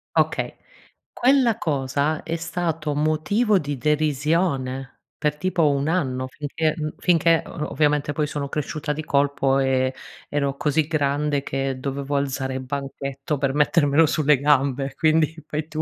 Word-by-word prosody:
Okay - - +1 0.6
Quella 250 -3 +3
cosa 140 - -1
è 165 +1 -3
stato 165 -3 -2
motivo 155 +9 +2
di 145 -3 -4
derisione, 150 -2 0 0.2
per 150 0 0
tipo 170 -2 +2
1 140 +1 0
anno 130 -7 -1
finché 155 +3 -2
mhmm, 155 -1 -3
finché 165 -2 +3
o 150 - -5
ovviamente 150 -1 +1
poi 150 0 0
sono 145 -1 -4
cresciuta 150 +1 -3
di 155 +1 -5
colpo 140 -2 +2
e 130 -1 +1 0.4
ero 140 -1 -1
così 150 +1 +1
grande 145 -2 0
che 135 -1 -2
dovevo 140 +1 -3
alzare 135 -1 -1
il 130 - -3
banchetto 140 +2 -4
per 135 -1 0
mettermelo 150 +1 +4
sulle 150 -1 +3
gambe, 140 -1 +2
quindi 160 0 +2
fai 155 0 -3
tu. 155 -1 -3
145 Hz, 145 wpm, -23 LUFS, 140-155 Hz, 0.6 s, mettermelo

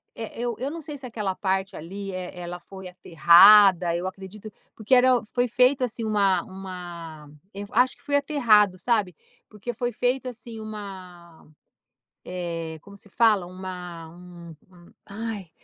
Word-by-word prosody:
Eh, 230 0 -8
eu 240 -2 -2
eu 265 +2 -2
não 330 0 -7
sei 295 -1 -8
se 260 - -11
aquela 210 -5 -3
parte 190 0 -2
ali, 195 +4 -7
eh, 185 -1 -6
ela 175 0 -6
foi 190 +1 -11
aterrada, 180 +1 +6
eu 175 +2 -3
acredito, 195 +3 -9 0.2
porque 220 +4 -2
era 250 -1 +4
foi 245 0 +1
feito, 255 +3 +3
assim, 235 -1 -3
uma 200 -4 +2
uma 175 -5 -9 0.2
eu 200 +1 -6
acho 250 +3 +2
que - - -26
foi 285 - -1
aterrado, 225 -10 +3
sabe. 205 -5 0 0.3
Porque 215 +3 -6
foi 240 +2 -3
feito, 250 +3 -1
assim, 235 -2 -9
uma, 185 -6 -10 0.8
eh, 165 -3 -5
como 200 0 -14
se 205 - -15
fala? 215 -4 +2
Uma 180 -2 -8
um 175 -1 -13 0.2
um 175 -1 -19
ai, 210 -3 -6
195 Hz, 155 wpm, -25 LUFS, 180-230 Hz, 0.8 s, aterrada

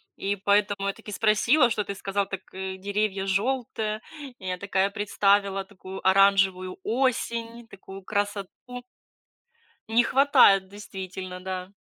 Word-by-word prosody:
И 200 +1 -2
поэтому 200 0 +1
я 200 - 0
таки 210 - -11
спросила, 225 +6 +3
что 220 -2 -1
ты 200 - -5
сказал, 200 0 -2
так 195 -1 -5
деревья 195 +1 -2
жёлтые. 220 +1 -1 0.4
Я 185 -1 -4
такая, 195 +1 0
представила 200 -1 +1
такую 190 -1 -10
оранжевую 190 -1 +3
осень, 235 -1 -1
такую 195 -1 -11
красоту. 205 -1 -2 1.4
Не 235 +2 +4
хватает 220 -9 +5
действительно, 190 -2 -8
да. 185 0 -5
200 Hz, 115 wpm, -26 LUFS, 190-215 Hz, 1.4 s, хватает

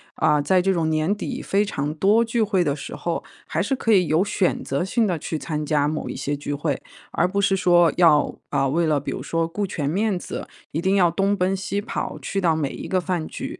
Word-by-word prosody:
啊， 150 -2 +3
在 185 +5 +3
这 195 +2 +2
种 165 -3 0
年 155 +4 +1
底 260 +5 -5
非 200 +2 +1
常 145 -6 -3
多 200 +8 +3
聚 230 0 -1
会 200 -4 +2
的 145 -4 0
时 145 - -7
候， - - -2 0.2
还 - - -1
是 270 - 0
可 230 -3 0
以 185 -5 +4
有 160 +4 +3
选 200 -2 0
择 140 +4 -1
性 225 +4 +1
地 180 -5 -1
去 160 - -3
参 150 -1 -3
加 145 -1 +2
某 155 0 -3
一 - - -5
些 145 0 -2
聚 145 0 -4
会。 145 -1 -2 0.3
而 170 - +2
不 200 +2 0
是 200 -1 +3
说 175 -3 +4
要， 160 -4 +4
啊， 135 - +1
为 165 +5 +1
了 150 -2 +2
比 - - -4
如 - - -5
说 165 0 -1
顾 200 +4 -3
全 145 -6 -2
面 200 +4 0
子， - - -6 0.2
一 160 - -2
定 190 +2 +2
要 175 -4 +4
东 195 +3 +1
奔 185 0 +1
西 195 +1 -2
跑， 220 - -4
去 195 - -2
到 170 -4 +2
每 150 -3 -1
一 - - -7
个 185 - +1
饭 175 -3 -2
局。 - - -6
175 Hz, 265 characters per minute, -23 LUFS, 155-195 Hz, 0.3 s, 以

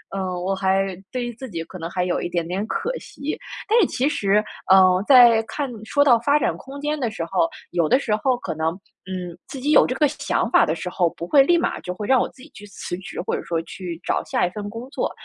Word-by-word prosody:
嗯， 195 - -2 0.2
我 195 +1 0
还 190 0 0 0.2
对 250 -2 -2
于 240 - -5
自 260 +2 -8
己 165 -5 -4
可 185 - -10
能 165 -1 -5
还 180 0 -1
有 180 - -1
一 - - -3
点 170 -1 -2
点 190 +4 -2
可 - - -2
惜。 280 +2 -6 0.3
但 450 +3 +4
是 - - +5
其 260 - 0
实， 210 -7 +2 0.3
呃， 185 0 +6
在 240 -4 +7
看 275 +5 -4
说 285 +6 +2
到 250 -5 +6
发 285 +6 +2
展 - - 0
空 275 +2 -10
间 295 +1 -1
的 240 -5 -1
时 215 - -4
候， 330 - +1 0.2
有 170 -3 +1
的 260 - +4
时 220 -6 0
候 250 +3 +1
可 - - -5
能， 160 +1 0 0.4
嗯， 180 -2 -6
自 270 - -7
己 285 +4 0
有 - - +7
这 255 - -2
个 300 +1 +3
想 300 - -1
法 - - +5
的 - - 0
时 180 - -5
候， 180 -1 +1
不 170 +1 -8
会 275 +6 +6
立 345 +4 +4
马 340 - -1
就 180 - -5
会 205 +2 -6
让 265 -1 +5
我 - - 0
自 255 - -19
己 285 - -12
去 200 +1 -11
辞 185 -3 -6
职， 190 - -8
或 - - -2
者 - - -5
说 165 -1 -2
去 175 -1 -7
找 - - -1
下 - - 0
一 - - -5
份 205 +1 -6
工 230 +4 -8
作。 - - -2
210 Hz, 285 characters per minute, -22 LUFS, 180-270 Hz, 0.4 s, 在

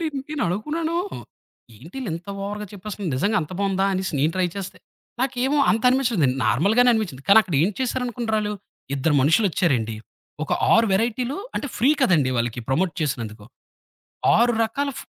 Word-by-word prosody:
ఏండి 330 - -1 0.2
నేనడుకున్నాను, 300 - -2 0.8
ఏంటిలింత 170 - -7
ఓవర్‌గా 210 +1 -5
చెప్పేస్తుంది, 200 -1 -6
నిజంగా 205 +10 +1
అంత 155 +2 -6
బాగుందా 195 -1 +1
అనేసి, 190 -1 -2
నేను 150 +4 +2
ట్రై 185 -1 +2
చేస్తే, 195 -2 -6 0.4
నాకేమో 265 +2 0
అంత 225 0 +1
అనిపించలేదండి. 230 - +2
నార్మల్‌గానే 205 - +4
అనిపించింది. 175 - -2
కానక్కడ 200 -4 +5
ఏం 195 - +2
చేశారనుకున్నరాలు, 235 -4 -1 0.4
ఇద్దరు 145 +3 +1
మనుషులొచ్చారండి. 150 - +2 0.5
ఒక - - -4 0.2
6 225 +1 +5
వెరైటీలు 240 - 0 0.2
అంటే, 290 - -3
ఫ్రీ 255 +5 +3
కదండీ 150 - +3
వాళ్ళకి 120 +1 -2
ప్రమోట్ 165 +7 +1
చేసినందుకు. 115 -8 -3 0.9
6 240 +1 +3
రకాల 280 +6 -2
ఫ్ - - -8
200 Hz, 135 wpm, -23 LUFS, 160-240 Hz, 0.9 s, కానక్కడ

